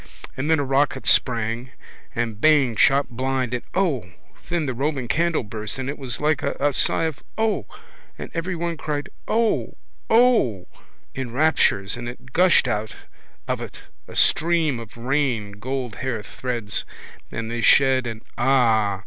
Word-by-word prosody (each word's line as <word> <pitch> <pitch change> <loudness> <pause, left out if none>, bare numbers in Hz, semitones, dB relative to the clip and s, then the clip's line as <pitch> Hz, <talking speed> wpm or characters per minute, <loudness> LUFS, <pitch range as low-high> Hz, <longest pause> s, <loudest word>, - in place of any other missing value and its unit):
And 140 +4 -2
then 160 - +5
a 145 - 0
rocket 135 +1 +1
sprang 115 0 +2 0.5
and 115 -2 -2
bang 145 -6 +4
shot 135 +6 +4
blind 130 0 -1
blank - - -4
and 125 - -2 0.2
O! 130 - -3 0.4
then 170 -3 0
the 130 - -2
Roman 135 0 -2
candle 165 +2 +1
burst 105 +1 -6
and 130 0 -4
it 145 - -9
was 125 -4 -2
like 150 +1 +1
a 145 -1 0
sigh 135 - +2
of 160 -4 -2 0.2
O! 220 -1 0 0.5
and - - -7
everyone 170 -1 -2
cried 150 -2 -3 0.2
O! 225 0 0 0.3
O! 225 - +3 0.5
in 130 -3 -5
raptures 125 -9 +2
and 120 0 -5
it 125 +1 -12
gushed 180 -6 +5
out 110 -2 -2 0.5
of - - -1
it - - -8 0.3
a - - -11
stream 160 -5 +2
of 115 0 -11
rain 125 -4 0
gold 130 -1 -4
hair 125 -4 -3
threads 115 0 -4 0.5
and 115 0 -4
they 120 0 -2
shed 130 0 +4
and 115 -1 -6 0.2
ah! 115 -6 +3
130 Hz, 155 wpm, -23 LUFS, 115-150 Hz, 0.5 s, then